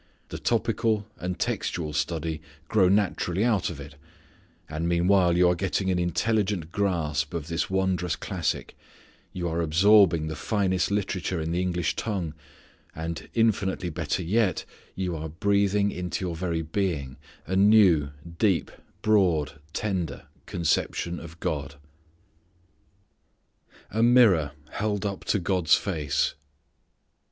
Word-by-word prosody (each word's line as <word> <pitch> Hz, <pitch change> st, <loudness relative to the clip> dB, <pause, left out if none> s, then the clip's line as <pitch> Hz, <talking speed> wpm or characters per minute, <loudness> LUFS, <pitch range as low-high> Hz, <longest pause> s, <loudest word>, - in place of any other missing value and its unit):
The -, -, -6 dB
topical 110 Hz, -2 st, 0 dB
and 90 Hz, 0 st, -3 dB
textual 80 Hz, -3 st, -2 dB
study 80 Hz, +1 st, -2 dB, 0.3 s
grow 95 Hz, -4 st, +4 dB
naturally 100 Hz, -1 st, +1 dB
out 105 Hz, -6 st, +1 dB
of 80 Hz, -5 st, -7 dB
it. 70 Hz, 0 st, -9 dB, 0.7 s
And 80 Hz, +2 st, -2 dB
meanwhile 90 Hz, 0 st, +3 dB
you 90 Hz, 0 st, +5 dB
are 90 Hz, -, +4 dB
getting 95 Hz, +1 st, -1 dB
an 90 Hz, -, +1 dB
intelligent 95 Hz, -1 st, 0 dB
grasp 80 Hz, -7 st, -1 dB
of 80 Hz, -1 st, -4 dB
this 85 Hz, +1 st, -1 dB
wondrous 95 Hz, -2 st, 0 dB
classic, -, -, -3 dB, 0.6 s
you 90 Hz, -1 st, -3 dB
are 85 Hz, +1 st, -1 dB
absorbing 85 Hz, 0 st, +5 dB
the 80 Hz, 0 st, -4 dB
finest 95 Hz, +1 st, 0 dB
literature 95 Hz, -3 st, -1 dB
in 80 Hz, +1 st, -2 dB
the 90 Hz, +1 st, 0 dB
English 90 Hz, -2 st, -1 dB
tongue, 95 Hz, -8 st, -3 dB, 0.6 s
and 80 Hz, 0 st, -5 dB
infinitely 100 Hz, -5 st, +1 dB
better 85 Hz, +2 st, -2 dB
yet, 100 Hz, +2 st, +1 dB, 0.3 s
you 90 Hz, -2 st, -2 dB
are 80 Hz, 0 st, -5 dB
breathing 100 Hz, +3 st, +1 dB
into 90 Hz, +1 st, -3 dB
your 85 Hz, -2 st, -3 dB
very 85 Hz, -1 st, -2 dB
being 80 Hz, -6 st, -2 dB, 0.3 s
a 95 Hz, -, -2 dB
new, 95 Hz, -7 st, +5 dB, 0.3 s
deep, 100 Hz, -6 st, +2 dB, 0.3 s
broad, 85 Hz, -9 st, +2 dB
tender 95 Hz, -4 st, -3 dB, 0.2 s
conception 85 Hz, 0 st, -1 dB
of 85 Hz, 0 st, -11 dB
God. 70 Hz, -2 st, -3 dB, 2.2 s
A 110 Hz, -, 0 dB
Mirror 110 Hz, -, +5 dB, 0.2 s
Held 105 Hz, -1 st, -2 dB
up 100 Hz, -1 st, -4 dB
to -, -, +2 dB
God's 90 Hz, -4 st, +3 dB
Face. 80 Hz, -8 st, -1 dB
90 Hz, 125 wpm, -26 LUFS, 80-100 Hz, 2.2 s, you